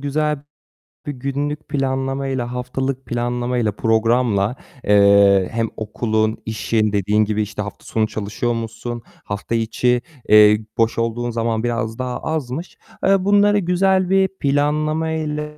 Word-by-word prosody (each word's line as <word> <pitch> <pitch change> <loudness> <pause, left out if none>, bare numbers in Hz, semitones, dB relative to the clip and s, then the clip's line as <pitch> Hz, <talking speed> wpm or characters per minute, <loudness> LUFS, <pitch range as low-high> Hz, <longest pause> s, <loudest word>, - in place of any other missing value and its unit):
güzel 150 +1 -1 0.6
bir 145 - -3
günlük 140 +3 -3
planlamayla, 135 -2 -2
haftalık 130 +1 -3
planlamayla, 120 -1 -1
programla, 110 0 +1 0.3
eee, 100 -2 +5
hem 115 -1 -1
okulun, 110 0 -1
işin, 110 0 0
dediğin 105 +2 +2
gibi, 110 0 -1
işte, 105 0 -4
hafta 100 -1 -8
sonu 110 -1 0
çalışıyor 110 +3 -2
musun? 115 +1 -5 0.2
Hafta 100 +3 -4
içi, 120 +2 +1 0.3
eee, 105 0 +7 0.2
boş 115 -1 +1
olduğun 115 +1 -1
zaman 115 -1 -1
biraz 115 -1 -2
daha 125 -1 -3
azmış. 155 +1 -4 0.3
Eee, 195 -1 +3
bunları 205 +1 +4
güzel 185 0 +2
bir 190 0 +4
planlamayla 150 +2 0
120 Hz, 125 wpm, -20 LUFS, 110-145 Hz, 0.6 s, eee